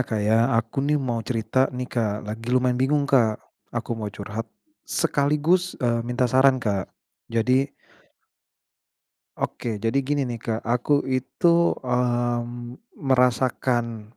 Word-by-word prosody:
Kak 110 -4 -1
ya, 110 +3 +3
aku 115 +4 -1
nih 150 +2 +2
mau 125 -5 -1
cerita 115 +3 0
nih 125 0 -4
Kak, 110 -5 -2
lagi 110 +3 -6
lumayan 125 0 +2
bingung 145 +2 +2
Kak. 120 -6 +3 0.3
Aku - - -4
mau 110 -2 -3
curhat, 105 +3 -6 0.4
sekaligus, 165 +4 +1
eee, 120 -1 0
minta 120 +2 -1
saran 130 +2 +4
Kak. 105 -6 -2 0.4
Jadi 125 +4 +2 1.7
Oke. 115 -3 -3
Jadi 115 +6 0
gini 140 +1 0
nih 120 -2 -5
Kak, 115 0 -2
aku 125 +5 +1
itu, 170 +7 +2
mmm, 120 0 -1 0.2
merasakan, 125 - 0
125 Hz, 125 wpm, -24 LUFS, 115-135 Hz, 1.7 s, saran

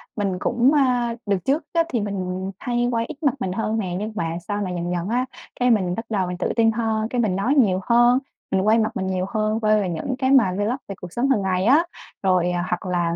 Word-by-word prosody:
mình 195 -4 -1
cũng, 240 +5 +2
a, 250 -5 +2
đợt 200 -2 +1
trước 285 +4 +1
á, 335 -1 +3
thì 240 -7 -1
mình 190 -2 -3
hay 240 0 0
quay 230 -1 0
ít - - -8
mặt 280 - +3
mình 190 -6 -2
hơn 220 +3 -1
nè, 180 -4 -3
nhưng 215 +2 -4
mà 165 -4 -2
sau 205 0 -2
này 185 -3 -3
dần 175 0 -3
dần 175 +3 -2
á, 250 +2 +1 0.3
cái 250 - +3
mình 185 -5 +1
bắt 225 - -5
đầu 195 -4 0
mình 180 0 -4
tự - - -1
tin 225 -1 +4
hơn, 220 -1 -1
cái 245 - 0
mình 205 -5 0
nói 240 +9 +1
nhiều 200 -9 +3
hơn, 240 +3 +4 0.3
mình 190 - +2
quay 220 +2 +5
mặt 220 -1 +1
mình 190 0 -2
nhiều 185 -1 -1
hơn, 215 0 0
quay 215 -1 +3
về 185 - -2
những 175 +10 -3
cái 260 0 +1
mà 240 -9 +5
vlog 210 +4 0
về 195 - -6
cuộc 180 -1 -8
sống 255 +3 0
hàng 250 -7 +3
ngày 185 0 0
á. 290 +7 +5 0.4
Rồi 180 -2 +2 0.2
hoặc 180 +1 -2
là, 175 -2 0
215 Hz, 255 wpm, -22 LUFS, 185-240 Hz, 0.4 s, quay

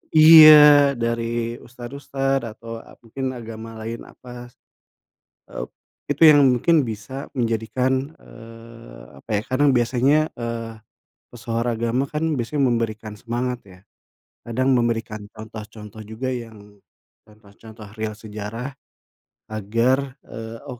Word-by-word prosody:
iya, 155 -3 +9
dari 115 0 -2
ustad-ustad 135 +2 -4
atau 115 +1 -9
ap - - -16
mungkin 130 +3 -5
agama 115 -1 -9
lain, 115 +1 -6
apa 125 -1 -12
s 120 - -23 1.0
eee, - - -6 0.4
itu 145 +2 -1
yang 145 -1 +7
mungkin 135 +5 +3
bisa 115 +4 -7
menjadikan, 125 +4 -1
eee, 115 - -14 0.2
apa - - -17
ya, - - -4
karena 135 +3 +1
biasanya, 130 +4 +2
eee, 115 -1 -5 0.6
pesohor 115 -1 -3
agama 120 +3 -1
kan 150 +3 -4 0.2
biasanya 140 +5 -2
memberikan 110 -2 -3
semangat 120 +2 -3
ya, 90 -1 -16 0.7
kadang 130 +3 0
memberikan 115 -3 -2
contoh-contoh 110 -1 -10
juga, 110 +5 -4
yang 110 -4 -9 0.5
contoh-contoh 110 +1 -15
real 110 0 -3
sejarah 110 +3 -7 0.8
agar, 120 +6 -1
eee, 115 0 -9
oh. 125 -2 -8
115 Hz, 115 wpm, -22 LUFS, 110-130 Hz, 1.0 s, iya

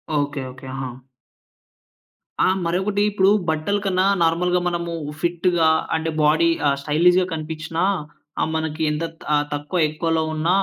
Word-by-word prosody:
Okay 145 -1 -1
okay. 130 +1 -12
హా! 130 -1 -3 1.6
ఆ! - - +4 0.2
మరొకటి 190 +4 0
ఇప్పుడు 195 -1 +3 0.2
బట్టల 160 +6 0
కన్నా 185 -1 +1 0.2
నార్మల్‌గా 175 +2 +2
మనము 170 -1 -2 0.3
ఫిట్‌గా 175 -1 +2 0.3
అంటే 160 0 -1
బాడీ 160 +3 +4 0.2
ఆహ్, 140 - +3
స్టైలిష్‌గా 175 +5 +3
కనిపించినా 160 +2 -3 0.6
ఆహ్, - - 0
మనకి 160 0 -3
ఎంత 150 +2 -2 0.5
తక్కువ 145 +5 -2
ఎక్కువలో 160 +1 0
ఉన్న, 155 +2 -1
165 Hz, 125 wpm, -22 LUFS, 155-180 Hz, 1.6 s, ఆ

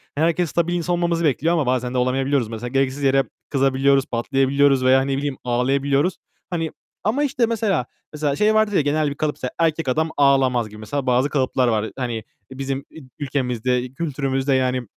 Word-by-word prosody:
herkes 165 +3 +1
stabil 170 +3 0
bir - - +1
insan 175 +1 -1
olmamızı 170 -1 0
bekliyor 155 +4 +2
ama 160 -4 +1
bazen 125 0 0
de - - -1
olamayabiliyoruz 130 0 +1
mesela. 115 +2 -5
Gereksiz 135 +2 -1
yere 135 0 +4 0.3
kızabiliyoruz, 135 0 +2
patlayabiliyoruz 135 +2 +2
veya, 130 +1 +5
ne 135 0 -1
bileyim, 140 -1 -3
ağlayabiliyoruz. 135 +6 +1 0.3
Hani, 165 -3 -2 0.3
ama 245 +8 +1
işte, 260 -4 +1
mesela 210 - 0 0.3
mesela 150 -2 -1
şey 210 +6 +3
vardır 215 -1 +2
ya, 185 - +4
genel 145 +1 +1
bir 140 - -5
kalıp 150 0 -1
mesela 125 - -5
erkek 165 -2 +1
adam 160 +5 +1
ağlamaz 135 -5 +3
gibi 105 +1 -12
mesela 135 +6 -3
bazı 125 +3 +2
kalıplar 130 -2 +1
var. 110 -2 0
Hani 120 -4 -3 0.3
bizim 135 0 -3
ü - - -11 0.2
ülkemizde, 125 -3 -1
kültürümüzde, 135 -3 -1
yani, 130 -1 +1
135 Hz, 180 wpm, -22 LUFS, 130-155 Hz, 0.3 s, veya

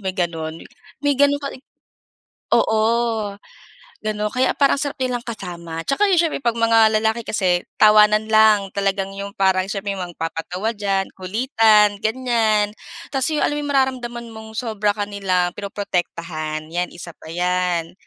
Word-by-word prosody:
may 190 -2 -4
gano'n? 165 -3 -2 0.5
May 285 - +4
gano'n 285 +1 +3
ka 280 - -3
ri - - -11 0.9
oo, 220 -1 +2 0.7
gano'n, 210 0 -2
kaya 255 +1 +2
parang 280 0 +3
ang 295 - -1
sarap 285 +1 -4
nilang 250 -2 -1
kasama. 170 -7 -6
'Tsaka 410 +10 +2
'yun 365 - +3
siyempre 325 -4 -1
'pag 235 -3 0
mga 225 -1 +5
lalaki 220 +1 0
kasi 180 -5 +1 0.2
tawanan 215 0 +6
lang, 215 -2 +5
talagang 195 -1 -1
yung 200 0 -5
parang 190 -1 +2
siyempre 200 0 -3
may 195 - -6
mga 175 -1 -5
magpapatawa 165 +5 -3
diyan, 195 -2 0
kulitan, 210 0 +3
ganyan. 220 -3 +1 0.4
Tapos 270 +1 +1
'yon, 305 -1 +1
alam 295 - -1
yung 290 - -4
mararamdaman 255 -3 -1
mong 220 0 -10
sobra 215 -4 -1
ka 205 -1 -2
nila 185 -3 0
pinoprotektahan, 170 -6 -3
'yan, 175 +1 -1
isa 170 0 -9
pa - - -13
'yan, 180 -1 -1
210 Hz, 155 wpm, -21 LUFS, 185-235 Hz, 0.9 s, tawanan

